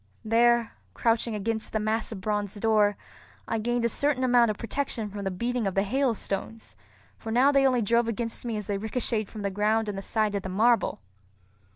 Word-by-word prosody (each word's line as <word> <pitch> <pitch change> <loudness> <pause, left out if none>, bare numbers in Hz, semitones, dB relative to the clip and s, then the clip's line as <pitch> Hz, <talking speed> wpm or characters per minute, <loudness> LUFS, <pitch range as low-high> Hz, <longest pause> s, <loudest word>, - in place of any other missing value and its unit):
There, 235 +1 +3 0.2
crouching 230 -1 +1
against 220 +2 -3
the 220 - +1
massive 215 -1 -2
bronze 205 0 -2
door, 210 -1 +2 0.5
I 225 - -1
gained 240 +1 0
a - - +2
certain 280 +2 +1
amount 245 -2 +4
of 210 - -2
protection 230 -3 -3
from 200 0 -6
the - - +1
beating 235 +4 -2
of 190 - -3
the 195 - +3
hailstones, 225 - -2 0.4
for 225 - -6
now 255 +5 +4
they 275 -1 +4
only 250 -3 +2
drove 235 +3 +2
against 230 0 -3
me 230 -3 -3
as 210 - -5
they 200 0 -2
ricochetted 220 0 -1
from 215 -1 -8
the 200 - -1
ground 215 +3 +1
and 205 - -3
the - - -6
side 215 +1 0
of 200 - -1
the 190 - -6
marble. 225 - +2
225 Hz, 200 wpm, -27 LUFS, 205-235 Hz, 0.5 s, amount